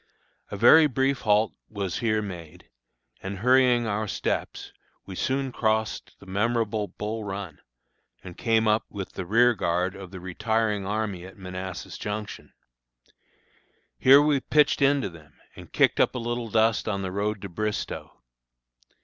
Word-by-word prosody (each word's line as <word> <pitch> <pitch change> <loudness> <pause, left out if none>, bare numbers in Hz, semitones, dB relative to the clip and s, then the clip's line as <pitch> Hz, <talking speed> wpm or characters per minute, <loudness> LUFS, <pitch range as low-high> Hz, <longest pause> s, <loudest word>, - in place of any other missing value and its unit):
A 100 - -5
very 150 +9 +7
brief 135 0 0
halt 105 0 +2 0.2
was 100 -4 -3
here 110 -2 0
made, 90 -3 -9 0.5
and, 95 +1 -5
hurrying 125 +2 +4
our 110 0 -2
steps, - - -3 0.3
we 95 - -8
soon 130 +6 -1
crossed 110 -2 -1
the - - -15
memorable 105 +1 -1
Bull 110 +2 -5
Run, 95 -5 -6 0.6
and 90 -2 -9
came 115 -1 +1
up 110 +1 +3
with 100 -2 -6
the 95 - -6
rearguard 95 -5 +2
of 95 -2 -9
the 95 0 -9
retiring 105 +2 -1
army 105 -3 -2
at 95 +1 -12
Manassas 95 -1 -7
Junction. 105 0 -6 1.5
Here 140 +3 +7
we 150 -2 +2
pitched 150 +2 +2
into 140 -2 +3
them, 75 -3 -16 0.2
and - - -12
kicked - - +3
up - - +3
a - - -1
little 120 -1 -3
dust 110 +1 +2
on 100 -2 -2
the 95 - -3
road 105 +2 -2
to 100 - -5
Bristoe. 105 +4 -4
105 Hz, 150 wpm, -26 LUFS, 95-115 Hz, 1.5 s, very